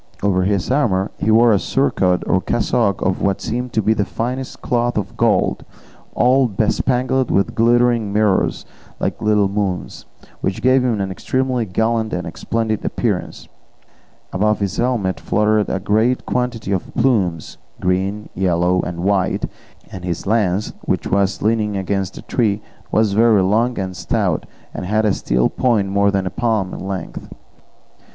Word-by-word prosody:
Over 95 -2 +2
his 100 +2 0
armour 105 -9 +1
he - - 0
wore 115 +2 +6
a 100 - +3
surcoat 95 -10 +1
or 95 - +2
cassock 105 -3 0
of 95 0 0
what 100 -1 +1
seemed 125 +2 -3
to 110 - +1
be 110 - +3
the 105 - 0
finest 125 +6 -4
cloth 120 -1 0
of 105 - -3
gold, - - +1 0.5
all 130 +1 +4
bespangled 125 +5 0
with 100 - +1
glittering 120 -2 +2
mirrors 105 -2 +1 0.3
like - - -2
little 105 -2 +3
moons, 95 -12 -3 0.3
which 95 - -3
gave 130 0 +4
him 120 -4 0
an 95 -1 -2
extremely 130 +3 -1
gallant 110 +3 0
and 90 -2 -4
splendid 110 -2 -2
appearance; - - -2 0.9
above 105 +3 +1
his 100 -3 -2
helmet 115 -7 0
fluttered 105 0 +1
a 95 - -1
great 110 +6 +1
quantity 125 -5 -2
of 95 -2 -2
plumes, 105 - 0 0.2
green, 95 +3 -1
yellow, 90 0 +1
and 85 -1 -5
white, 95 0 +1 0.5
and 95 -2 -8
his 85 -2 -3
lance, 105 -2 0
which - - -1
was 100 -1 0
leaning 105 -2 +1
against 95 0 -2
a - - -9
tree, 105 -4 0 0.3
was 110 -2 +2
very 110 -2 +4
long 115 +6 +1
and 95 -1 -3
stout, 90 -3 -1 0.3
and 90 - -5
had 110 +2 +1
a 105 - +3
steel 60 -7 +1
point 110 -6 +1
more 100 +1 +2
than 100 -1 0
a 95 - -3
palm 110 -5 -1
in - - -6
length. 95 -3 -6
105 Hz, 160 wpm, -19 LUFS, 95-115 Hz, 0.9 s, wore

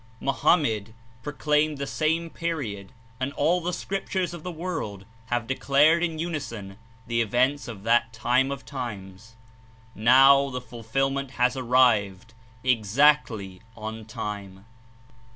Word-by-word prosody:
Mahomet 115 - +1 0.3
proclaimed 150 +2 0
the 140 - -3
same 160 +3 -1
period 120 - -4 0.3
and 130 +1 -2
all 170 +5 +1
the 175 +2 -2
Scriptures 190 -1 -3
of 170 - -8
the 180 - -5
world 155 - -5 0.2
have 120 -1 -1
declared 140 +6 +3
In 165 -2 -1
unison 115 - -5 0.3
the 115 0 0
events 130 +6 +1
of 105 -5 -8
that 115 0 +2
time 125 +4 +1
of 140 -1 -6
times. 110 -5 -7 0.6
Now 135 +5 +6
thk 125 -1 -5
fulfil 120 +4 -2
ment 135 -1 -4
HAS 125 +1 +2
ARRIVED. 115 -5 +2 0.3
EXACTLY 115 -4 +2 0.2
"ON 110 0 -6
TIME." 100 -3 -7
130 Hz, 125 wpm, -25 LUFS, 110-150 Hz, 0.6 s, Now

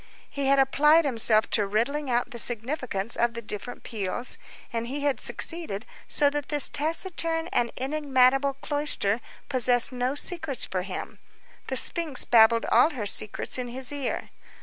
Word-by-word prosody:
He 280 -1 -2
had 275 0 +4
applied 300 +4 +4
himself 225 -4 +3
to 205 -3 +2
riddling 260 +8 -1
out 245 +1 0
the 235 - -4
significance 235 -2 -1
of 235 0 0
the 235 - -5
different 215 +4 -6
peals, 220 +3 -3 0.3
and 230 0 -3
he 280 +3 -4
had 285 -2 -1
succeeded, 320 - -2 0.2
so 290 - +2
that 295 -1 -4
this 295 -2 +4
taciturn 325 +1 -1
and 235 -1 0
enigmatical 270 -1 +2
cloister 290 -8 0 0.3
possessed 250 -2 +3
no 250 +2 -2
secrets 320 -3 -1
for 185 - -3
him; 185 0 -7 0.5
the - - -1
sphinx 325 -6 +4
babbled 230 0 +5
all - - +5
her 250 -10 -5
secrets 210 +4 -1
in 250 - -4
his 255 +2 -5
ear. 285 -3 -4
255 Hz, 155 wpm, -26 LUFS, 235-290 Hz, 0.5 s, babbled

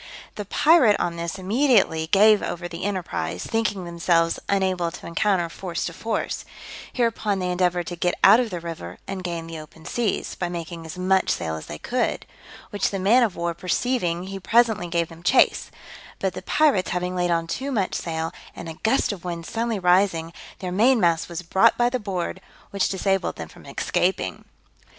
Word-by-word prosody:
The 205 - -6
pirate 275 - +5
on 170 -1 -1
this 170 +2 -4
immediately 195 - +2
gave 210 +4 +6
over 175 0 -4
the 170 +1 -6
enterprise, 90 - -3
thinking 210 -5 -1
themselves 170 -1 +1
unable 185 -3 +1
to 165 - -10
encounter 175 +1 +1
force 170 +1 -4
to 170 - -4
force: 220 +5 -3 0.5
hereupon 225 -4 0
they 180 -1 -1
endeavoured 180 -1 +1
to 175 - -5
get 175 +1 0
out 210 +4 +8
of 245 -2 0
the 180 -3 -4
river 165 - -7
and 195 -1 -5
gain 170 -2 -4
the 165 -1 -7
open 160 +1 -13
seas, 230 +2 -1
by 175 - -3
making 170 -1 -6
as 160 - -8
much 190 +1 +2
sail 80 - -1
as 80 - -8
they 75 - -6
could; - - -1 0.5
which 205 -1 0
the 195 - -3
man 205 +7 +4
of 220 -6 +1
war 170 0 -2
perceiving, 180 0 -1
he 195 +1 -6
presently 220 -3 +2
gave 170 -1 0
them 165 0 -13
chase, 250 +9 +3 0.5
but - - -1
the - - -6
pirates 290 -12 +2
having 180 +1 -2
laid 175 -1 0
on 165 -1 +1
too 265 +11 -3
much 200 -7 0
sail, 160 -1 -3 0.2
and 170 - -8
a 160 -1 -8
gust 240 +3 +2
of 195 -4 -7
wind 170 -2 -5
suddenly 230 +2 -2
rising, 180 -3 +2 0.2
their 185 -2 -5
main 230 +7 +4
mast 170 -4 +2
was 170 +1 -5
brought 190 +6 +4
by 240 0 +2
the 255 - -1
board, 185 -3 -4 0.3
which 200 -1 +1
disabled 195 0 0
them - - -7
from - - -16
escaping. - - -1
180 Hz, 190 wpm, -24 LUFS, 170-205 Hz, 0.5 s, out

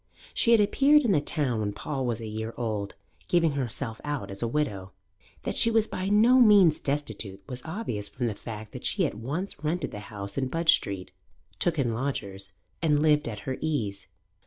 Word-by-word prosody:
She - - +2
had 230 -1 +7
appeared 280 +8 +5
in 235 - +2
the 150 - +3
town 140 -6 +1
when 105 -1 -2
Paul 135 +3 -3
was 120 -2 -1
a 115 - -6
year 110 +1 -5
old, 105 -4 -3 0.3
giving 165 -3 +3
herself 125 -4 -3
out 145 -7 -3
as 100 - -7
a 120 - 0
widow. 105 -9 -2 0.5
That - - -2
she 230 - +5
was 225 -1 +3
by 190 -3 -3
no 230 +5 +6
means 205 -9 +6
destitute 110 -9 -4
was 125 0 -5
obvious 160 - -4
from 125 - -3
the 115 - 0
fact 110 0 -8
that - - -8
she - - +2
at - - -2
once 145 - -5
rented 165 +4 -1
the 105 - -6
house 100 +1 -5
in 130 - 0
Budge 165 +4 +4
Street, 95 -2 -2 0.5
took 170 -2 +2
in 125 -5 +1
lodgers, 100 -7 -3 0.3
and 150 -3 +3
lived 150 -2 +3
at 105 -3 -5
her 130 -1 -2
ease. 105 -11 -2
135 Hz, 200 wpm, -27 LUFS, 110-165 Hz, 0.5 s, had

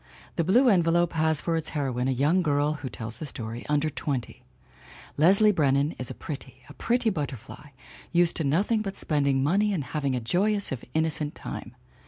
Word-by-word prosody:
The 170 - +1
Blue 235 +10 +4
Envelope 175 -4 +3
has 160 -2 +1
for 165 +2 -1
its 160 -1 -2
heroine 130 -3 -1
a - - +1
young 145 +8 +2
girl 145 -2 +1
(who 130 - -4
tells 115 0 -6
the 155 - -6
story) 115 -2 -7
under 150 +1 +2
twenty. 140 -4 -4 0.7
Leslie 195 +7 +5
Brennan 145 -4 +2
is 125 - -5
pretty, 130 -4 -8
a 145 - -12
pretty 235 +5 0
butterfly, 140 - -6 0.4
used 175 0 +2
to 160 - -1
nothing 195 +10 +1
but 195 -2 -5
spend 145 -3 +2
ing 135 -1 +2
money 200 +8 +2
and 175 -8 -1
having 140 0 -2
a - - -1
joyous 200 - +2
if 130 - -4
innocent 155 -2 0
time. - - -8
150 Hz, 185 wpm, -26 LUFS, 135-175 Hz, 0.7 s, Leslie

